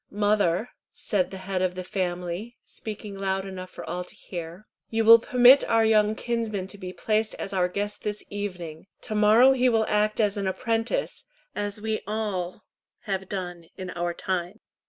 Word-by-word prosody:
"Mother," 205 0 +1 0.2
said 190 -4 0
the 190 - -7
head 185 0 -3
of 185 -1 0
the 185 - -4
family, 180 +4 -3
speaking 210 -2 -7
loud 195 0 -1
enough 185 -1 -7
for - - -9
all 180 0 -3
to - - -13
hear, 175 +2 -8 0.2
"you 225 0 0
will 230 +1 +10
permit 250 +3 +6
our 225 -1 +3
young 215 -1 +4
kinsman 225 -5 -2
to - - -11
be 185 -2 -6
placed 215 +3 0
as 195 - -5
our 180 -2 +2
guest 205 +3 -3
this 210 0 -4
evening. 180 -5 -5
To - - -4
morrow 215 +5 +6
he 255 -1 +3
will 225 -2 +2
act 210 +1 +1
as 210 -2 +2
an 200 -1 -1
apprentice, 225 - -1 0.3
as 205 0 -3
we 220 0 -1
all 205 -3 -3 0.4
have 190 -2 -3
done 180 -3 -5
in 185 -1 -5
our 175 0 -2
time." 185 +4 -3
205 Hz, 175 wpm, -26 LUFS, 185-220 Hz, 0.4 s, will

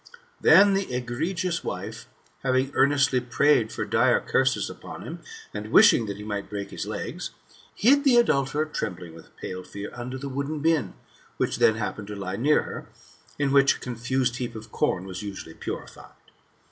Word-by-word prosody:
Then 200 +1 +7
the 195 -5 -1
egregious 165 +9 -2
wife, - - -6 0.3
having 130 +1 +1
earnestly 140 -1 +3
prayed 125 -1 +2
for - - -3
dire - - +3
curses - - +1
upon - - -9
him, - - -7 0.3
and 105 +1 -6
wishing 115 -2 +6
that 100 -1 -5
he 105 - -8
might 100 -2 -4
break 100 -1 -5
his - - -5
legs, - - -5 0.5
hid 280 +6 +4
the 270 -4 +5
adulterer, 145 - +2
trembling 90 - -5
with 80 - -15
pale 90 0 -6
fear, 100 +2 -8
under 125 +2 -6
the 140 +2 -6
wooden 140 +3 -3
bin, 160 -2 +1 0.4
which - - 0
then 110 - +4
happened 105 -1 -4
to 105 - -6
lie 95 -1 -4
near 145 +8 +3
her, - - -8 0.5
in 145 -1 +1
which 135 -1 +5
a - - -11
confused 125 0 -1
heap 120 -2 -4
of 110 0 -9
corn 90 0 0
was 95 0 -6
usually 100 -5 -7
purified. - - -8
125 Hz, 170 wpm, -26 LUFS, 105-145 Hz, 0.5 s, Then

